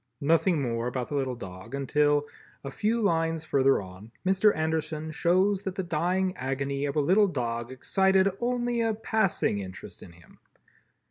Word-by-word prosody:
Nothing 165 +3 +3
more 115 -1 -2
about 125 0 -3
the - - -5
little 130 -3 -1
dog 95 +3 -8
until, 145 +1 +2 0.4
a 140 - -6
few 220 +8 0
lines 165 -3 0
further 135 -2 +3
on, 95 +4 -12 0.2
Mr. 190 +3 +4
Anderson 160 0 -2
shows 185 +5 +2
that 190 -2 -5
the 190 - -2
dying 180 +3 0
agony 140 +2 -2
of 140 - -3
a - - +2
little 190 +8 +4
dog 120 -6 -3
excited 190 +8 +2
only 240 -1 0
a 225 -1 +1
passing 215 - 0
interest 95 -1 -9
in 85 - -12
him. 85 -1 -20
155 Hz, 160 wpm, -27 LUFS, 130-190 Hz, 0.4 s, Mr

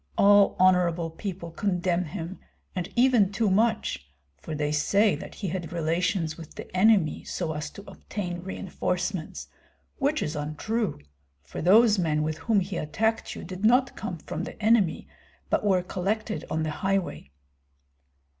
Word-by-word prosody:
All 205 0 +6
honorable 180 -3 +3
people 170 0 -6
condemn 180 -1 0
him, 170 +3 -6 0.4
and 180 -2 -3
even 240 -5 +4
too 205 0 +1
much; 195 - +1 0.3
for 155 - -7
they 150 0 -1
say 200 +8 +3
that - - -9
he 195 - -4
had 175 -1 -4
relations 170 0 0
with 160 - -11
the - - -9
enemy 190 -4 +3
so 165 -3 -3
as 150 0 -4
to 200 - -11
obtain 180 -4 -5
reinforcements, 185 -1 -3 0.5
which 295 +2 +1
is 150 - -3
untrue, 155 - -2 0.4
for - - -7
those 210 +4 +6
men 155 -3 +1
with 155 0 -2
whom 220 -4 +2
he 185 -1 -4
attacked 220 +9 -1
you - - -7
did 185 +2 -7
not 250 +4 +4
come 185 -6 -5
from - - -5
the - - -9
enemy, 210 -6 +2 0.4
but - - +2
were 190 -3 +3
collected 210 +5 -2
on 160 0 -1
the 155 - -2
highway." 190 - -1
185 Hz, 155 wpm, -27 LUFS, 165-210 Hz, 0.5 s, All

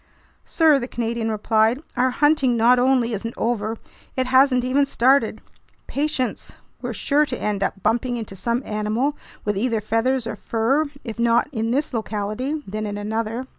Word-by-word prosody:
"Sir," 315 -4 +4
the 245 - -4
Canadian 235 -2 -2
replied, 220 +3 +2 0.2
"our 255 +1 +2
hunting 275 -2 +2
not 240 +2 +5
only 250 -2 +2
isn't 230 +3 -4
over, 225 -1 -1 0.4
it 260 - +1
hasn't 260 0 +4
even 270 +3 +3
started. 250 -4 +2 0.4
Patience! 280 -3 -2 0.3
We're - - -3
sure 295 +1 +2
to 250 - -4
end 205 -2 -2
up 195 -1 -2
bumping 240 +1 +1
into 220 -4 -6
some 235 +6 -1
animal 215 +7 -1 0.3
with 210 -1 0
either 225 +2 0
feathers 225 +4 0
or 230 - -4
fur, 235 +8 0 0.2
if 230 -2 -7
not 235 +3 +3
in 225 -3 -2
this 275 +4 -1
locality, 225 +7 -3
then 215 +2 -4
in 205 0 -4
another." 220 +4 -3
235 Hz, 165 wpm, -22 LUFS, 220-260 Hz, 0.4 s, not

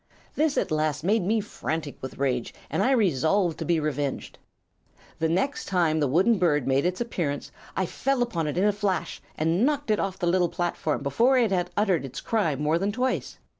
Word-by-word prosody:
"This 305 -1 +1
at - - 0
last 155 -1 0
made 210 +5 +2
me 215 +5 +1
frantic 155 - -4
with 130 - -7
rage, 125 -3 -1 0.2
and - - 0
I - - +3
resolved 185 - +2
to - - -3
be 170 -2 +2
revenged. 145 -2 -3 0.8
The 160 - +1
next 195 - 0
time 170 -5 +1
the 145 - +2
wooden 190 - +3
bird 150 -7 +2
made 135 +5 +2
its 180 0 -2
appearance 165 -12 -3 0.3
I 190 - +1 0.2
new 275 -2 +3
upon 170 -10 -2
it 150 - -3
in 185 - +2
a 210 0 +3
flash 200 -2 -2 0.2
and 165 +6 +1
knocked 285 -3 +1
it 210 - +2
off 195 -1 -2
the 180 - -2
little 175 0 +2
platform 170 -5 -2
before 235 - +3
it 230 -5 +3
had 180 -2 0
uttered 195 -6 +2
its 135 0 -6
cry 205 -10 0
more 150 +4 +1
than 200 +2 0
twice. 255 +4 -2
175 Hz, 205 wpm, -26 LUFS, 150-210 Hz, 0.8 s, I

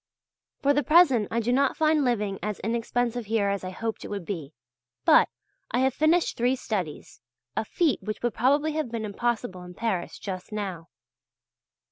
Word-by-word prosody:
For 285 +1 +5
the 290 - +2
present 290 - +5
I 230 - 0
do 235 +2 +1
not 275 +2 +2
find 310 -2 +3
living 210 -6 0
as 210 -1 -3
inexpensive 235 +1 -1
here 210 -2 +1
as 200 -1 -2
I 185 - -4
hoped 225 +4 -4
it - - -6
would 200 -4 -5
be; 160 -8 -5 0.5
but - - +6 0.4
I 245 - +1
have 265 -1 +3
finished 315 +5 +2
three 245 +2 +2
studies 185 - -4 0.3
a - - 0
feat 300 +4 +1
which 215 +1 -5
would 240 -2 +1
probably 285 +6 +2
have 305 -4 -2
been 225 -2 -3
impossible 215 -2 -2
in 180 0 -10
Paris 195 -5 -2
just 185 0 -6
now. 190 -6 -4
230 Hz, 175 wpm, -26 LUFS, 200-260 Hz, 0.5 s, but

